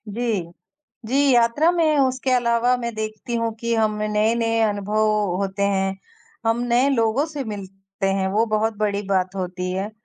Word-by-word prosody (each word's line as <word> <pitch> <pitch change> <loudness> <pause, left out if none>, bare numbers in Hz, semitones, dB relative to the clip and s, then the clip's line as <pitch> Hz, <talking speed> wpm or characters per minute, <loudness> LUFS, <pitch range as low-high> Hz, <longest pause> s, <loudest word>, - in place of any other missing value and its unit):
जी। 225 -2 -1 0.7
जी 275 +4 +2
यात्रा 240 +8 +4
में 320 -4 +2
उसके 260 -1 +1
अलावा 245 0 +2
मैं 235 -2 -4
देखती 215 +2 -5
हूँ 230 -1 -1
कि 235 0 0
हम 215 -1 +1
नए-नए 225 +2 +1
अनुभव 210 0 +1 0.3
होते 195 0 -2
हैं, 195 -1 0 0.5
हम 225 +1 +2
नए 245 +3 +3
लोगों 230 +1 +2
से 295 -4 -5
मिलते 195 -2 -6
हैं, 195 0 +1
वो 210 +4 +2
बहुत 215 0 0
बड़ी 205 -1 0
बात 190 -1 0
होती 180 -1 -3
है। 195 +3 -3
220 Hz, 160 wpm, -22 LUFS, 200-240 Hz, 0.7 s, यात्रा